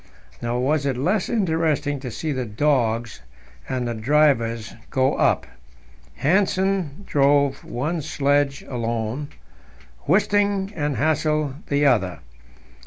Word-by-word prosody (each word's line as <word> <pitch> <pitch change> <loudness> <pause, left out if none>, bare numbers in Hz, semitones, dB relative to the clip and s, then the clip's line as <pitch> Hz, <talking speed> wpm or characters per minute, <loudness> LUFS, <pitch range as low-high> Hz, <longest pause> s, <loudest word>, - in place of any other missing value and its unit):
Nor 120 +1 -1
was 145 +2 +1
it 130 -3 -1
less 180 +9 0
interesting 160 -8 0
to 130 -1 -6
see 155 +6 -4
the 130 -3 -2
dogs 115 - 0 0.5
and 125 -2 -1
the 120 - -2
drivers 115 -3 +1 0.2
go 130 0 +2
up. - - +2 0.8
Hanssen 190 0 +1
drove 140 -1 +2
one 155 +7 -3
sledge 145 -1 0
alone; 115 +2 -3 0.8
Wisting 200 +2 +2
and 145 -3 -1
Hassel 155 -1 +1
the 145 +1 +2
other. 105 -10 +2
145 Hz, 110 wpm, -23 LUFS, 125-160 Hz, 0.8 s, go